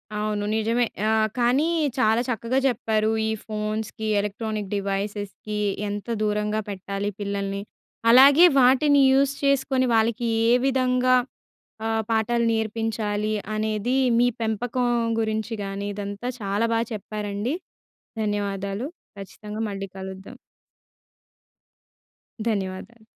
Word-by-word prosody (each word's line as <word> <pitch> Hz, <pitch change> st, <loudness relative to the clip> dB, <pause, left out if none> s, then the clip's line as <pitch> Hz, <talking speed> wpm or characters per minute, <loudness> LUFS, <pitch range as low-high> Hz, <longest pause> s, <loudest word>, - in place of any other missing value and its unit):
అవును. 210 Hz, -1 st, -1 dB
నిజమే! 230 Hz, +2 st, +1 dB, 0.2 s
ఆహ్, 220 Hz, 0 st, +2 dB
కానీ 250 Hz, +6 st, +3 dB, 0.3 s
చాలా 220 Hz, 0 st, +3 dB
చక్కగా 235 Hz, +3 st, 0 dB
చెప్పారూ. 220 Hz, -3 st, +1 dB, 0.2 s
ఈ -, -, 0 dB
ఫోన్స్‌కి, 215 Hz, 0 st, -3 dB
ఎలక్ట్రానిక్ 210 Hz, 0 st, -3 dB
డివైసెస్‌కి 205 Hz, +1 st, -3 dB, 0.3 s
ఎంత 205 Hz, +2 st, -5 dB, 0.2 s
దూరంగా 210 Hz, 0 st, 0 dB
పెట్టాలి 200 Hz, +1 st, -3 dB
పిల్లల్ని. 200 Hz, -1 st, -3 dB, 0.5 s
అలాగే, 280 Hz, +7 st, +8 dB
వాటిని 275 Hz, +3 st, +5 dB
యూస్ 275 Hz, +1 st, +3 dB
చేసుకొని 270 Hz, -2 st, +2 dB
వాళ్ళకీ 230 Hz, +1 st, +1 dB, 0.2 s
ఏ -, -, +6 dB
విధంగా 255 Hz, -1 st, +3 dB, 0.7 s
ఆహ్, 225 Hz, 0 st, 0 dB
పాఠాలు 230 Hz, +1 st, +1 dB
నేర్పించాలి 220 Hz, -1 st, -1 dB, 0.2 s
అనేది, 215 Hz, +3 st, -1 dB, 0.2 s
మీ 245 Hz, -, +5 dB
పెంపకం 235 Hz, +3 st, -1 dB, 0.3 s
గురించి 220 Hz, +1 st, -2 dB
కానీ, 200 Hz, +1 st, -4 dB
ఇదంతా 205 Hz, +3 st, -5 dB
చాలా 205 Hz, +2 st, 0 dB
బాగా 225 Hz, 0 st, +1 dB
చెప్పారండి. 210 Hz, +4 st, -3 dB, 0.7 s
ధన్యవాదాలు. 200 Hz, +2 st, -2 dB, 0.3 s
ఖచ్చితంగా 210 Hz, +2 st, -8 dB
మళ్ళీ 195 Hz, 0 st, -5 dB
కలుద్దాం. 190 Hz, +5 st, -8 dB, 2.1 s
ధన్యవాదాలు. 205 Hz, +3 st, -4 dB
215 Hz, 100 wpm, -24 LUFS, 205-240 Hz, 2.1 s, అలాగే